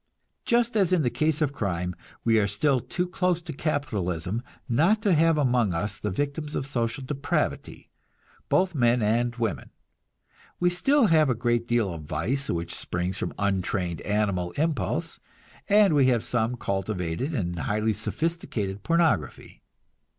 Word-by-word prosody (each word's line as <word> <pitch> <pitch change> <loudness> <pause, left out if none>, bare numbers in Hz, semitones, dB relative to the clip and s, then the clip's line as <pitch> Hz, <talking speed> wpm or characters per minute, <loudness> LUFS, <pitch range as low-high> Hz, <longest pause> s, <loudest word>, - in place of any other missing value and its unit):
Just 235 0 +2
as 195 -4 +3
in 180 -4 +3
the 120 - +1
case 155 0 +1
of 140 -2 -1
crime, 90 -7 -2 0.3
we 115 -1 +4
are 100 - +2
still 130 +7 +1
too 180 +8 -2
close 180 -1 0
to 165 - -6
capitalism 110 - -2 0.3
not 165 - +3
to 200 -4 +3
have 165 0 +4
among 120 - +2
us 100 +4 -3
the 105 - -2
victims 145 - -3
of 135 - -2
social 130 0 -2
depravity, 140 +1 -3 0.6
both 185 -1 +2
men 120 -4 +3
and 120 +3 +1
women. 110 - -2 0.9
We 175 0 +3
still 270 +9 +3
have 155 -6 +4
a 125 - +2
great 120 0 0
deal 115 -6 +1
of 80 -2 -8
vice 120 - -2
which 85 0 -2
springs 90 +2 -3
from - - -2
untrained 95 -3 -1
animal 100 -4 -1
impulse, 155 -4 -1 0.5
and 205 -3 +5
we 140 -3 +4
have 120 -4 +2
some 120 0 -1
cultivated 95 - -2
and 90 -7 -2
highly 110 +4 0
sophisticated 110 - -3
pornography. 165 - 0
120 Hz, 150 wpm, -26 LUFS, 100-155 Hz, 0.9 s, and